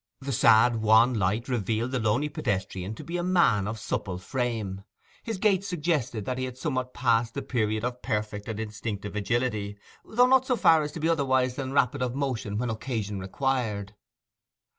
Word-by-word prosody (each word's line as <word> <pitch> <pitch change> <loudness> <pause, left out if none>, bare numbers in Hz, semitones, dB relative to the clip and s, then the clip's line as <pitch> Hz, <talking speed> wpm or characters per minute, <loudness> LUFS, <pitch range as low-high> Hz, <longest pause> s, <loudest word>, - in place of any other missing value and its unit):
The 140 0 -4
sad 115 0 +5
wan 110 +3 +5
light 105 +2 0
revealed 115 0 -1
the 130 - 0
lonely 110 +6 +1
pedestrian 95 -5 -3
to - - -9
be 170 +1 -4
a 175 - -2
man 170 - +3
of 110 +1 -4
supple 95 -3 -3
frame; 110 -3 -3 0.4
his 225 -3 -4
gait 195 -1 +2
suggested 150 - -1
that 130 +2 -2
he 130 - -1
had 125 -1 -7
somewhat 130 0 -3
passed 115 -2 +1
the - - -3
period 110 -3 -1
of 125 0 -3
perfect 105 -3 -3
and 110 -2 -4
instinctive 105 -2 -5
agility, 105 -1 -1 0.3
though 245 +3 +3
not 260 0 +4
so 250 - +2
far 160 -8 +5
as 150 0 -3
to - - -6
be 160 - 0
otherwise 130 -6 +2
than 135 -1 -4
rapid 140 0 +2
of 125 0 -1
motion 120 -7 -2
when 120 0 -1
occasion 110 -3 -3
required. 105 -1 -2
120 Hz, 185 wpm, -27 LUFS, 105-135 Hz, 0.4 s, sad